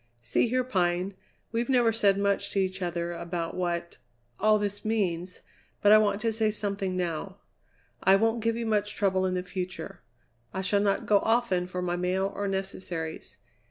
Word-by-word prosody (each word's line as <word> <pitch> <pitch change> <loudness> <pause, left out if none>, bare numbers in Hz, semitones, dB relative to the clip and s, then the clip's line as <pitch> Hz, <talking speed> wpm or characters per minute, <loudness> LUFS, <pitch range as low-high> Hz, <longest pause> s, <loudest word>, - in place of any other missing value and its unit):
"See 120 - +2
here, 255 +2 +1
Pine, 180 -4 0 0.4
we've 235 +2 -1
never 240 -3 +4
said 200 -3 +3
much 200 0 +1
to 200 - -1
each 190 0 -1
other 175 -1 -2
about 170 -1 -4
what 170 -1 -2 0.4
all 215 +1 +4
this 205 -1 -3
means, 185 -5 -1 0.4
but 205 - +5
I 215 - +9
want 205 -1 +1
to 225 0 +1
say 220 0 +2
something 200 -3 -2
now. 180 +2 -3 0.6
I 190 - +6
won't 225 +3 +2
give 230 +1 +1
you 235 0 -3
much 210 -2 0
trouble 190 -2 +1
in 185 - -1
the 180 - -1
future. 185 0 -6 0.5
I 190 - -1
shall 200 +1 +2
not 200 -1 +1
go 205 -1 +5
often 225 -6 +1
for 180 0 -4
my 175 0 -1
mail, 185 +2 0
or 200 0 -2
necessaries. 185 -4 -4
195 Hz, 180 wpm, -28 LUFS, 180-215 Hz, 0.6 s, I